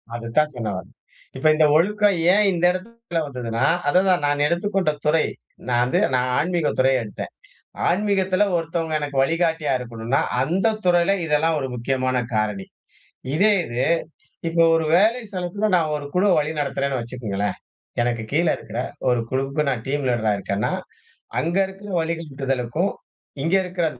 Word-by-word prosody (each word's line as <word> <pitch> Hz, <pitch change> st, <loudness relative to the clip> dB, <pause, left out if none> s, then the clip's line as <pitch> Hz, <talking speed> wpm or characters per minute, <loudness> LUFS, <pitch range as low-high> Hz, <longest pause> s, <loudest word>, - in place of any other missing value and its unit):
அது 115 Hz, -1 st, -6 dB
தான் 150 Hz, 0 st, +4 dB
சொல்ல 115 Hz, -3 st, -3 dB
வர்றேன். 95 Hz, -, -10 dB, 0.4 s
இப்ப 135 Hz, -, +1 dB
இந்த 155 Hz, 0 st, +4 dB
ஒழுக்கம் 205 Hz, +2 st, +2 dB, 0.2 s
ஏன் 210 Hz, +1 st, +4 dB
இந்த 175 Hz, 0 st, +1 dB
இடத்தில 210 Hz, 0 st, -5 dB
வந்ததுன்னா, 125 Hz, -2 st, -2 dB, 0.2 s
அதுதான் 180 Hz, -2 st, +3 dB
நான் 145 Hz, 0 st, +1 dB
எடுத்துக்கொண்ட 180 Hz, +1 st, 0 dB
துறை. 155 Hz, +1 st, +3 dB, 0.4 s
நான் 120 Hz, -1 st, +2 dB
வந்து 125 Hz, -, +1 dB, 0.2 s
நான் 125 Hz, 0 st, +1 dB
ஆன்மீகத் 170 Hz, -1 st, 0 dB
துறை 130 Hz, +1 st, +4 dB
எடுத்தேன். 105 Hz, -3 st, -7 dB, 0.6 s
ஆன்மீகத்தில 190 Hz, 0 st, +2 dB
ஒருத்தவங்க 165 Hz, -1 st, -2 dB
எனக்கு 145 Hz, -2 st, -4 dB
வழிகாட்டியா 160 Hz, -1 st, 0 dB
இருக்கணுன்னா, 120 Hz, +1 st, -2 dB, 0.2 s
அந்த 190 Hz, -, +1 dB
துறையில 175 Hz, +2 st, +4 dB
இதெல்லாம் 160 Hz, +1 st, +2 dB
ஒரு 135 Hz, -, -2 dB
முக்கியமான 130 Hz, +1 st, -1 dB, 0.2 s
காரணி. 105 Hz, -3 st, -1 dB, 0.7 s
இதே 205 Hz, +7 st, +4 dB
இது, 120 Hz, +2 st, -2 dB, 0.7 s
இப்ப 165 Hz, 0 st, +2 dB
ஒரு 165 Hz, -1 st, +1 dB
வேலை 220 Hz, +7 st, +4 dB
ஸ்தலத்தில 190 Hz, +3 st, -2 dB
நான் 160 Hz, -3 st, +1 dB
ஒரு 145 Hz, -, -7 dB
குழுவ 190 Hz, +2 st, +3 dB
வழிநடத்துறேன்னு 140 Hz, -3 st, -1 dB
வச்சுக்கொங்களேன், 110 Hz, -4 st, -3 dB, 0.4 s
எனக்கு 120 Hz, -1 st, -1 dB
கீழே 165 Hz, +3 st, +3 dB
இருக்கிற 110 Hz, +2 st, -6 dB, 0.3 s
ஒரு 125 Hz, -1 st, +2 dB
குழுவுக்கு 135 Hz, +3 st, -1 dB
நான் 125 Hz, -5 st, -2 dB
டீம் 145 Hz, 0 st, -1 dB
லீடரா 110 Hz, -3 st, +1 dB
இருக்கேன்னா, 100 Hz, +1 st, -2 dB, 0.7 s
அங்க 170 Hz, +3 st, -1 dB
இருக்கிற 195 Hz, +2 st, -11 dB
வழிகாட்டுதலுக்கும், 145 Hz, -1 st, -2 dB, 0.5 s
இங்க 165 Hz, +5 st, +1 dB
இருக்கிற 180 Hz, -2 st, -1 dB
155 Hz, 145 wpm, -22 LUFS, 125-180 Hz, 0.7 s, தான்